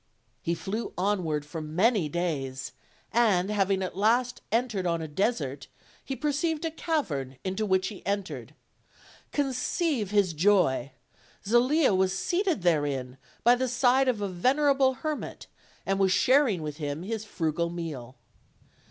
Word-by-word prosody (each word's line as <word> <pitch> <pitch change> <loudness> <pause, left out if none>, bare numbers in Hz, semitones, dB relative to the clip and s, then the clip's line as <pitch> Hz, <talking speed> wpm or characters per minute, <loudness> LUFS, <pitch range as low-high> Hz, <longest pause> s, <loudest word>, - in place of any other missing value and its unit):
He 170 - -1
flew 210 +7 -4
onward 180 -6 0
for 155 +2 -6
many 175 +3 +1
days, 140 -6 -3 0.4
and 210 -5 +3
having 195 -2 +1
at 185 - -4
last 240 +5 +2
entered 220 -5 0
on 170 -1 0
a 160 - -4
desert, 150 - -1 0.4
he 270 - -4
perceived 300 +3 -1
a 325 - -1
cavern, 170 - -2
into 190 +3 -2
which 190 -1 +2
he 205 -4 -10
entered. 200 -1 -4 0.8
Conceive 270 - 0
his 200 -4 +2
joy! 160 -7 +2 0.6
Zelia 255 +4 +4
was 190 0 +2
seated 355 - 0
therein 140 -6 0 0.2
by 240 - +7
the 255 +1 0
side 255 +1 +3
of 235 -5 +1
a - - 0
vener 265 +11 +3
able 265 -1 +3
hermit, 305 +2 -5 0.4
and 195 0 0
was 190 -1 +3
sharing 250 - +3
with 150 -1 -5
him 145 +1 -4
his 220 +2 -3
frugal 170 -4 -1
meal. 150 -8 -6
195 Hz, 145 wpm, -28 LUFS, 165-250 Hz, 0.8 s, by